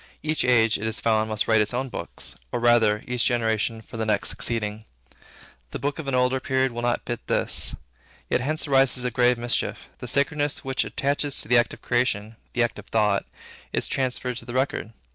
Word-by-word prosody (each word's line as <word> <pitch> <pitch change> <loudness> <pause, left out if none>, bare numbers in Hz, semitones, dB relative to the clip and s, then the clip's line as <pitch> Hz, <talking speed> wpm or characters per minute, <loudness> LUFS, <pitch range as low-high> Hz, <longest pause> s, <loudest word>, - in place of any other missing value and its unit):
Each 155 0 0
age, 115 -3 +4
it 110 - -2
is 110 - -2
found, 110 -1 +1
must 110 -1 0
write 110 -1 +4
its 105 +3 -1
own 130 +2 -1
books; 85 -7 -3 0.2
or 120 - -1
rather, 115 -3 +4
each 125 -1 0
generation 115 -2 0
for 115 - -10
the 110 - -1
next 105 -2 +1
succeeding. 110 -2 0 0.8
The - - -5
books 145 +2 -3
of 155 - -6
an 135 - 0
older 125 +1 +2
period 130 0 +1
will 120 0 -5
not 120 0 0
fit 120 - -5
this. - - +1 0.5
Yet - - +1
hence 155 +4 -1
arises 135 -2 +4
a 125 - 0
grave 125 +1 +3
mischief. 120 0 -1
The - - -7
sacredness 145 0 0
which 135 0 0
attaches 140 0 -1
to - - -1
the 120 +1 +6
act 120 - +1
of - - -24
creation, 115 -3 0 0.2
the 120 - +2
act 115 -2 -2
of 105 - -12
thought, 105 -3 +1 0.5
is - - 0
transferred 125 -2 -1
to - - -7
the 120 - -7
record. 130 -4 -1
120 Hz, 205 wpm, -25 LUFS, 110-130 Hz, 0.8 s, the